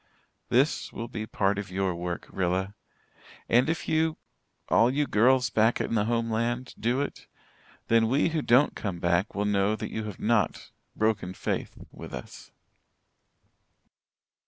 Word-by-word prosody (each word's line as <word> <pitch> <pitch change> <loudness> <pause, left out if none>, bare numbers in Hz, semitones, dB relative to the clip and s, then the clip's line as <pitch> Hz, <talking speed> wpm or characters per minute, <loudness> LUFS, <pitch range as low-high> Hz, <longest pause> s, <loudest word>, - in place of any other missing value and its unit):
This 135 +6 +2
will 115 - -5
be 110 -2 -5
part 100 -1 0
of 100 - -6
your 95 0 -1
work, 85 0 -4
Rilla. 95 +2 -1 0.7
And 125 +5 +3
if 165 - -2
you 160 0 +1 0.5
all 115 - +4
you 145 +3 +1
girls 125 +2 +3
back 110 +2 +3
in - - -2
the 105 -2 +2
homeland 115 +2 -1
do 120 +4 +1
it, 145 - -5 0.6
then 115 -1 +4
we 135 +8 +2
who 160 -1 -1
don't 130 +2 +4
come 95 -5 -4
back 85 +3 0
will 105 +1 0
know 105 +1 +2
that - - -6
you 110 -1 -4
have 105 -3 -7
not 110 -2 0 0.2
'broken 105 -4 0
faith' - - -3
with - - -8
us. 60 - -10
110 Hz, 150 wpm, -27 LUFS, 100-125 Hz, 0.7 s, all